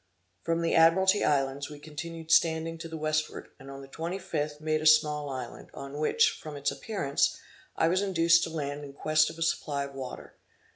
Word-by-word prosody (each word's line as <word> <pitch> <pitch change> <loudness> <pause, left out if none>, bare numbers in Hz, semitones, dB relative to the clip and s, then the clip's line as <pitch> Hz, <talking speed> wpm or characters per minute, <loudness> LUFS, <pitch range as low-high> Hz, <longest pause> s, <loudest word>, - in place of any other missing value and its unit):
From 165 0 -1
the 165 - +1
Admiralty 190 +5 +5
Islands, 140 0 0
we 150 - -9
continued 160 +2 -7
standing 165 0 +2
to 165 - -6
the 160 - -6
westward, 155 0 -2
and 135 0 -12
on 135 0 -9
the - - -11
twenty 165 +6 -4
fifth, 150 -5 -3
made 155 0 -1
a - - -5
small 150 -1 +4
island, 130 -3 -7
on 140 +1 -7
which, 455 - +2
from 155 -1 -8
its 140 0 -1
appearance, 165 -11 -1 0.4
I 160 - +2
was 185 +3 +2
induced 170 -3 +4
to - - -6
land 145 -2 -4
in 140 -1 -9
quest 155 +2 +2
of - - -10
a 165 - -1
supply 145 -3 -1
of 140 0 -8
water. 130 -2 -8
155 Hz, 200 wpm, -28 LUFS, 145-165 Hz, 0.4 s, Admiralty